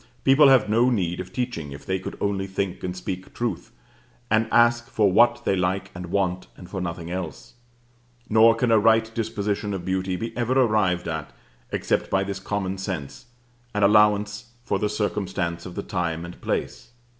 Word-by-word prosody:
People 135 +2 +6
have 130 -6 +5
no 115 +4 +3
need 90 -8 -1
of 90 - -6
teaching 100 - -4
if 70 - -11
they 95 0 -1
could - - -7
only 100 -1 -1
think 95 -1 -3
and 90 0 -4
speak 90 0 -5
truth, 120 -1 -3 0.6
and 110 0 +3
ask 120 0 +4
for 105 -3 +2
what 120 +4 +4
they 95 - +2
like 95 +1 -1
and 90 0 -7
want, 90 0 -1
and 90 - -11
for 95 +1 -5
nothing 85 -1 -5
else: 90 -4 -6 0.7
nor 110 +1 +6
can 125 -3 +1
a 110 - +6
right 110 +1 +3
disposition 105 -2 -2
of 90 -2 -6
beauty 95 0 -1
be 115 +5 -5
ever 125 +2 +1
arrived 105 -7 +2
at 80 -2 -4 0.4
except - - -1
by 95 0 +2
this 95 0 -4
common 95 -1 -3
sense, 90 - -5 0.5
and 105 - +1
allowance 105 0 +3 0.2
for - - -1
the 105 - 0
circumstances 95 -5 -2
of 90 - -10
the - - -4
time 85 -2 -2
and 85 - -11
place. 120 - -3
100 Hz, 180 wpm, -24 LUFS, 90-110 Hz, 0.7 s, People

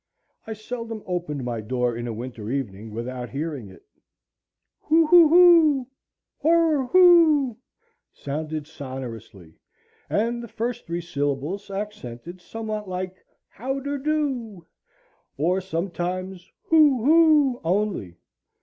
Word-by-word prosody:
I 220 - -4
seldom 225 0 -7
opened 175 -7 -3
my 120 -2 -3
door 125 +1 -1
in 120 +1 -5
a - - -3
winter 115 -2 -7
evening 115 -5 -4
without 120 +2 -6
hearing 140 -6 -5
it; 95 - -16 1.0
Hoo 325 +1 +4
hoo 335 0 +7
hoo, 325 -6 +6 0.5
hoorer, 320 -3 +3
hoo, 325 -7 +5 0.6
sounded 155 +1 -5
sonorously, 125 - -9 0.5
and 235 +3 0
the 235 - -8
first 230 +2 -4
three 170 +1 -3
syllables 150 +4 -3
accented 190 - -7
somewhat 215 -1 -6
like 185 0 -5 0.2
how 265 +5 -4
der 285 +1 -4
do; 265 - -2 0.7
or 180 +6 +1
sometimes 185 +1 -4
hoo 295 -7 +4
hoo 305 -5 +4
only. 180 - -1
190 Hz, 115 wpm, -24 LUFS, -, 1.0 s, hoo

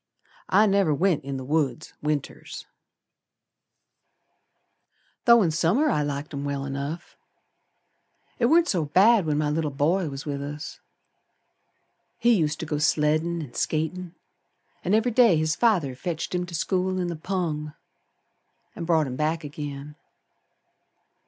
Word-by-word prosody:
I 210 +3 +5
never 195 -7 +2
went 175 -2 +1
in 135 0 -4
t' 130 - -6
th' - - -11
woods 155 0 -1
Winters, 150 -2 -4 2.6
Though 235 -2 +7
in 165 - +1
Summer 195 - +2
I 150 - +1
liked 145 +1 -4
'em 140 0 -4
well 140 -1 -3
enough. 140 +5 -5 1.2
It 235 - +3
warn't 335 +5 +4
so 170 -5 0
bad 195 +4 +4
when 150 -1 +1
my 150 -1 0
little 155 0 -1
boy 155 +5 0
was 135 +1 -7
with 140 -2 -3
us. 145 +1 -7 1.4
He 240 0 +4
used 155 -6 0
to - - -3
go 150 -1 -2
sleddin' 155 +2 +1
and 125 -5 -12
skatin', 165 +3 -2 0.7
An' 190 - +2
every 230 +3 +2
day 230 -7 +5
his 155 +1 0
father 180 - +2
fetched 165 +6 -4
him 180 0 -1
to 170 - -7
school 185 +3 0
in 180 - -1
the 170 -1 -3
pung 155 -3 -3 1.0
An' 170 - -5
brought 160 -2 +2
him 130 -2 -5
back 155 +2 -1
agin. 145 0 -7
160 Hz, 145 wpm, -25 LUFS, 145-185 Hz, 2.6 s, Though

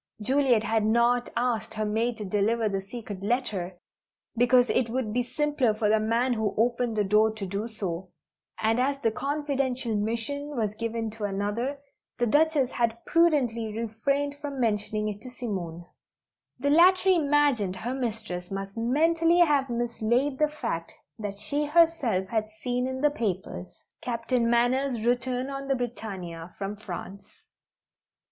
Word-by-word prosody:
Juliet 255 0 +2
had 225 -1 +1
not 235 +2 +3
asked 235 -2 -1
her 215 0 -1
maid 225 +3 0
to 210 - -5
deliver 215 +3 +1
the 195 -2 -1
secret 205 -1 -8
letter, 200 -5 -2 0.6
because 245 +1 +5
it 250 -2 +1
would 235 -3 -2
be 245 - +2
simpler 275 -3 0
for 215 -1 +1
the 220 +1 +4
man 230 +4 +1
who 220 -3 -1
opened 235 0 +1
the 210 - +3
door 210 +2 +4
to 210 -2 -5
do 200 +4 -3
so, 185 -5 -5 0.5
and 225 +2 +2
as 275 +2 +1
the 225 - +3
confidential 275 -3 -1
mission 235 +7 -3
was 215 -3 0
given 230 0 -3
to 215 -1 -4
another, 205 +7 -2 0.4
the 240 - +2
Duchess 295 +1 +3
had 230 -1 0
prudently 245 -10 +2
refrained 275 +6 -1
for 290 - -3
mentioning 215 -5 -1
it 210 -1 -5
to 255 - -8
Simone. 185 -9 -5 0.7
The 285 +3 0
latter 370 +4 +6
imagined 290 - +3
her 235 +6 -4
mistress 220 -8 -4
must 195 0 -5
mentally 325 +8 +3
have 295 -6 +4
mislaid 240 +3 0
the 305 - +4
fact 235 - -4 0.2
that 205 -2 -4
she 285 +9 0
herself 300 - +3
had 220 -2 -1
seen 250 +3 -2
in 260 0 -4
the 295 0 +4
papers: 185 - -4 0.2
Captain 235 0 0
Manners' 245 0 +1
return 250 +2 0
on 275 0 -5
the 270 - +2
Britannia, 190 -9 -6
from 200 +1 -4
France. 200 -1 -7
235 Hz, 155 wpm, -27 LUFS, 210-265 Hz, 0.7 s, latter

